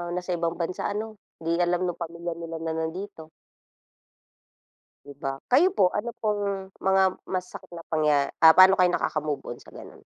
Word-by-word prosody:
nasa 180 Hz, 0 st, -4 dB
ibang 170 Hz, -1 st, -1 dB
bansa 170 Hz, +1 st, -3 dB
ano, 215 Hz, +1 st, -5 dB, 0.2 s
'di 170 Hz, +1 st, 0 dB
alam 175 Hz, +1 st, +1 dB
nung 175 Hz, -1 st, -3 dB
pamilya 170 Hz, +1 st, -5 dB
nila 165 Hz, -1 st, -6 dB
na 160 Hz, -, -2 dB
nandito. 160 Hz, +1 st, -5 dB, 1.8 s
'Di 140 Hz, 0 st, -13 dB
ba? 135 Hz, -1 st, -3 dB, 0.2 s
Kayo 355 Hz, +9 st, +4 dB
po 185 Hz, -4 st, +4 dB
ano 235 Hz, +3 st, -4 dB
pong 200 Hz, -3 st, -2 dB
mga 190 Hz, 0 st, +3 dB, 0.2 s
masakit 180 Hz, -1 st, -5 dB
na 165 Hz, -, -8 dB
pangya 150 Hz, -3 st, +2 dB
ah, 160 Hz, -1 st, +8 dB
pa'no 190 Hz, +1 st, +7 dB
kayo 180 Hz, -1 st, +4 dB
nakakamove-on 150 Hz, -5 st, -3 dB
sa -, -, -17 dB
ganun? -, -, -12 dB
175 Hz, 160 wpm, -26 LUFS, 160-195 Hz, 1.8 s, ah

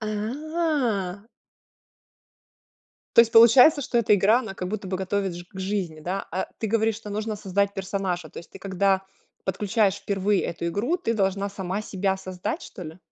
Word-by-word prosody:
А. 225 Hz, -, -2 dB, 1.9 s
То -, -, +10 dB
есть 230 Hz, -1 st, +4 dB
получается, 250 Hz, +7 st, +7 dB
что 240 Hz, -, 0 dB
эта 215 Hz, -2 st, +4 dB
игра, 205 Hz, +4 st, +4 dB
она 220 Hz, -6 st, -6 dB
как 180 Hz, -1 st, -4 dB
будто 200 Hz, -1 st, -4 dB
бы 185 Hz, -, -1 dB
готовит 190 Hz, 0 st, -2 dB
ж 175 Hz, -, -8 dB
к 190 Hz, -, -12 dB
жизни, 190 Hz, -5 st, -3 dB
да, 185 Hz, +5 st, -3 dB
а 185 Hz, -, -2 dB
ты 220 Hz, -, -2 dB
говоришь, 220 Hz, 0 st, +1 dB
что 210 Hz, -2 st, -9 dB
нужно 215 Hz, +1 st, -3 dB
создать 200 Hz, 0 st, 0 dB
персонажа. 190 Hz, -3 st, -3 dB
То -, -, -9 dB
есть 170 Hz, -, -11 dB
ты, -, -, -11 dB
когда 195 Hz, 0 st, +1 dB, 0.4 s
подключаешь 200 Hz, +1 st, +1 dB
впервые 200 Hz, 0 st, 0 dB
эту 170 Hz, 0 st, -4 dB
игру, 220 Hz, -, 0 dB
ты 290 Hz, -11 st, -1 dB
должна 195 Hz, -2 st, 0 dB
сама 195 Hz, +1 st, -4 dB
себя 195 Hz, -2 st, -1 dB
создать, 185 Hz, -1 st, -5 dB
что -, -, -9 dB
ли? 160 Hz, +3 st, -9 dB
200 Hz, 175 wpm, -25 LUFS, 190-220 Hz, 1.9 s, То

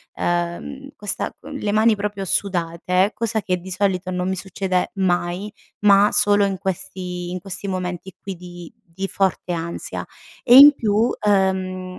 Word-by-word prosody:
uhm, 175 Hz, +11 st, -3 dB
questa 205 Hz, -1 st, -4 dB
con 285 Hz, +1 st, -10 dB
le 210 Hz, -7 st, -2 dB
mani 215 Hz, +1 st, +4 dB
proprio 200 Hz, -1 st, -4 dB
sudate, 180 Hz, +1 st, 0 dB
cosa 225 Hz, -1 st, -2 dB
che 185 Hz, -2 st, -1 dB
di 185 Hz, +2 st, -10 dB
solito 185 Hz, -1 st, -1 dB
non 180 Hz, 0 st, -2 dB
mi 190 Hz, -, -1 dB
succede 185 Hz, 0 st, -2 dB
mai, 180 Hz, +1 st, -1 dB, 0.4 s
ma, 200 Hz, 0 st, +6 dB
solo 205 Hz, 0 st, +3 dB
in 195 Hz, -1 st, 0 dB
questi 180 Hz, -1 st, -5 dB
in 185 Hz, -, -4 dB
questi 195 Hz, +1 st, -6 dB
momenti 180 Hz, 0 st, -4 dB
qui 195 Hz, -2 st, -6 dB
di 175 Hz, -1 st, -11 dB, 0.2 s
di 195 Hz, 0 st, -2 dB
forte 190 Hz, -2 st, -1 dB
ansia 170 Hz, 0 st, -5 dB, 0.4 s
e 245 Hz, -, +6 dB
in 290 Hz, +2 st, +11 dB
più, 220 Hz, -6 st, -1 dB, 0.3 s
uhm, 190 Hz, -2 st, 0 dB
190 Hz, 155 wpm, -21 LUFS, 180-205 Hz, 0.4 s, in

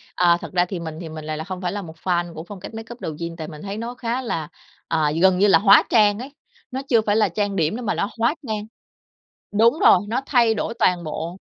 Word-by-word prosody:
À, 175 Hz, -1 st, +4 dB
thật -, -, -8 dB
ra 175 Hz, -1 st, +3 dB
thì 180 Hz, 0 st, -5 dB
mình 160 Hz, -2 st, -6 dB
thì 165 Hz, -, -7 dB
mình 155 Hz, -1 st, -8 dB
lại 155 Hz, 0 st, -3 dB
hông 185 Hz, -1 st, -5 dB
phải 180 Hz, -1 st, -1 dB
là 205 Hz, 0 st, -4 dB
một 160 Hz, -2 st, -10 dB
fan 175 Hz, -2 st, 0 dB
của 160 Hz, -, -7 dB
phong 205 Hz, -3 st, -9 dB
cách 195 Hz, -, -9 dB
makeup 225 Hz, +2 st, -8 dB
Douyin, 165 Hz, +2 st, -5 dB
tại 160 Hz, -2 st, -6 dB
mình 155 Hz, -2 st, -10 dB
thấy 200 Hz, +1 st, -5 dB
nó 235 Hz, +2 st, -5 dB
khá 245 Hz, +1 st, -2 dB
là 165 Hz, -11 st, -3 dB, 0.4 s
à, 155 Hz, -2 st, +1 dB
gần 190 Hz, -1 st, +5 dB
như 205 Hz, -, +5 dB
là 195 Hz, -, +6 dB
hóa 200 Hz, 0 st, +7 dB
trang 210 Hz, -1 st, +4 dB
ấy, 270 Hz, +3 st, -8 dB, 0.4 s
nó 265 Hz, +1 st, -3 dB
chưa 230 Hz, -3 st, +5 dB
phải 210 Hz, -1 st, 0 dB
là 215 Hz, -2 st, +3 dB
trang 205 Hz, +2 st, -2 dB
điểm 160 Hz, +2 st, +1 dB
nữa 245 Hz, -, -5 dB
mà 225 Hz, -, -1 dB
nó 200 Hz, -, -1 dB
hóa 235 Hz, +8 st, +2 dB
trang. 210 Hz, -1 st, -3 dB, 0.9 s
Đúng 230 Hz, +8 st, +3 dB
rồi, -, -, +7 dB
nó 240 Hz, +5 st, -1 dB
thay 235 Hz, -5 st, +3 dB
đổi 225 Hz, +1 st, -3 dB
toàn 180 Hz, -2 st, +2 dB
bộ. 165 Hz, +3 st, -5 dB
195 Hz, 255 wpm, -22 LUFS, 170-225 Hz, 0.9 s, hóa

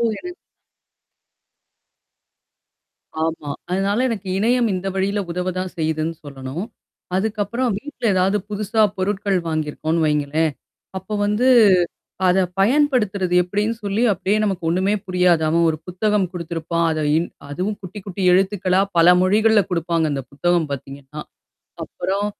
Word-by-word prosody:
ஓ! -, -, +1 dB, 0.2 s
எனக் 360 Hz, 0 st, -8 dB, 2.9 s
ஆமா. 160 Hz, -2 st, -2 dB, 0.2 s
அதனால 200 Hz, +6 st, +1 dB
எனக்கு 205 Hz, -5 st, -4 dB
இணையம் 235 Hz, +3 st, +2 dB
இந்த 185 Hz, +1 st, -4 dB
வழியில 195 Hz, +2 st, 0 dB
உதவ 180 Hz, +2 st, -2 dB
தான் 185 Hz, 0 st, -3 dB
செய்யுதுன்னு 160 Hz, 0 st, -1 dB
சொல்லணும். 140 Hz, +4 st, -6 dB, 0.5 s
அதுக்கப்புறம் 220 Hz, +4 st, -1 dB
வீட்ல 290 Hz, +1 st, -10 dB
எதாவது 190 Hz, +2 st, +2 dB
புதுசா 215 Hz, +1 st, 0 dB, 0.2 s
பொருட்கள் 195 Hz, 0 st, 0 dB
வாங்கியிருக்கோனு 155 Hz, +1 st, -2 dB
வைங்களேன். 150 Hz, +1 st, +1 dB, 0.5 s
அப்ப 190 Hz, +3 st, -5 dB
வந்து 210 Hz, +5 st, +1 dB, 0.8 s
அத 180 Hz, +1 st, +3 dB, 0.2 s
பயன்படுத்துறது 210 Hz, -7 st, +2 dB
எப்டின்னு 205 Hz, +5 st, -1 dB
சொல்லி 200 Hz, +3 st, 0 dB
அப்படியே 195 Hz, +2 st, 0 dB
நமக்கு 190 Hz, -5 st, -2 dB
ஒண்ணுமே 190 Hz, +4 st, +1 dB
புரியாது. 180 Hz, -3 st, +3 dB
அவன் 170 Hz, +1 st, +3 dB
ஒரு 155 Hz, -, -2 dB
புத்தகம் 200 Hz, +1 st, 0 dB
குடுத்திருப்பான். 170 Hz, -1 st, -2 dB
அத 155 Hz, -, -2 dB, 0.2 s
இன் 170 Hz, -, -2 dB, 0.2 s
அதுவும் 185 Hz, +8 st, -2 dB
குட்டி 190 Hz, +3 st, -8 dB
குட்டி 195 Hz, 0 st, -5 dB
எழுத்துக்களா 190 Hz, 0 st, +2 dB, 0.2 s
பல 175 Hz, +2 st, +7 dB
மொழிகள்ல 215 Hz, +2 st, +4 dB
குடுப்பாங்க, 170 Hz, -1 st, 0 dB
அந்த 135 Hz, -1 st, -3 dB
புத்தகம் 170 Hz, +2 st, +1 dB
பார்த்தீங்கன்னா. 140 Hz, +2 st, -8 dB, 0.6 s
அப்புறம் 200 Hz, +2 st, -2 dB
185 Hz, 125 wpm, -21 LUFS, 165-205 Hz, 2.9 s, பல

